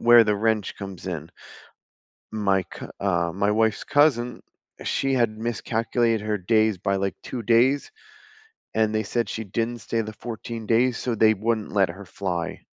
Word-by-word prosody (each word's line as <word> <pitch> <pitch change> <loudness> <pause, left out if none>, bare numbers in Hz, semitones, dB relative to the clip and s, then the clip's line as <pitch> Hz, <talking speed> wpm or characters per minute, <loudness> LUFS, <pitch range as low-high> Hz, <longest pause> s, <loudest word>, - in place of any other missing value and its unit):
where 120 -1 +8
the 105 - +2
wrench 110 -1 0
comes 95 -2 -8
in. 85 -2 -5 1.0
My 100 -3 +1
cou - - -10
uh, 85 -4 +1
my 100 +3 +1
wife's 110 -1 +1
cousin, 125 -5 +2 0.4
she 135 -1 0
had 115 -3 +1
miscalculated 115 0 0
her 105 -1 +1
days 110 +2 +2
by, 100 +1 0
like, 95 0 -1
2 125 - -5
days, 120 - +3 0.8
and 110 -1 +1
they 110 - +1
said 115 +2 -1
she 110 - -4
didn't 115 +4 -2
stay 115 - -2
the 110 -1 -3
14 115 0 -6
days, 120 +2 +3
so 125 - -2
they 110 0 +5
wouldn't 110 +1 -1
let 100 -3 +3
her 95 +4 -8
fly. 90 -3 -3
110 Hz, 165 wpm, -25 LUFS, 100-115 Hz, 1.0 s, where